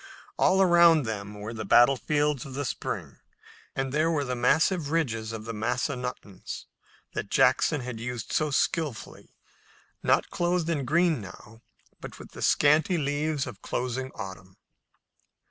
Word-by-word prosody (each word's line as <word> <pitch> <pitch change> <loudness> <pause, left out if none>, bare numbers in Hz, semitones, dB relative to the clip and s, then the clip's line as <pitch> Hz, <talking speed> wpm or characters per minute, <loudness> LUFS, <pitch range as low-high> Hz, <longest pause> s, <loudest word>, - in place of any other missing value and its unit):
All 190 +1 +4
around 170 -3 +6
them 105 -2 -5
were 105 +3 -6
their 110 -1 -5
battlefields 140 +5 +3
of 135 -1 -9
the 145 +1 -2
spring, - - -5 0.6
and 135 -1 -2
there 155 +2 +2
were 155 -3 0
the 125 -2 -3
massive 150 +6 +2
ridges 115 -9 -1
of 110 -1 -7
the 115 - -5
Massanuttons 125 -3 -4 0.5
that 100 - -4
Jackson 135 +3 +3
had 125 -2 -6
used 120 0 -5
so 155 -1 +1
skillfully, 145 -2 -2 0.7
not - - +2
clothed 175 -1 0
in 145 -5 -1
green 165 -1 +2
now, 110 +3 -12 0.4
but - - -9
with - - -12
the - - -10
scanty 160 +6 +3
leaves 145 0 -1
of 120 -7 -9
closing 130 +1 -3
autumn. 95 -2 -9
135 Hz, 145 wpm, -27 LUFS, 115-155 Hz, 0.7 s, around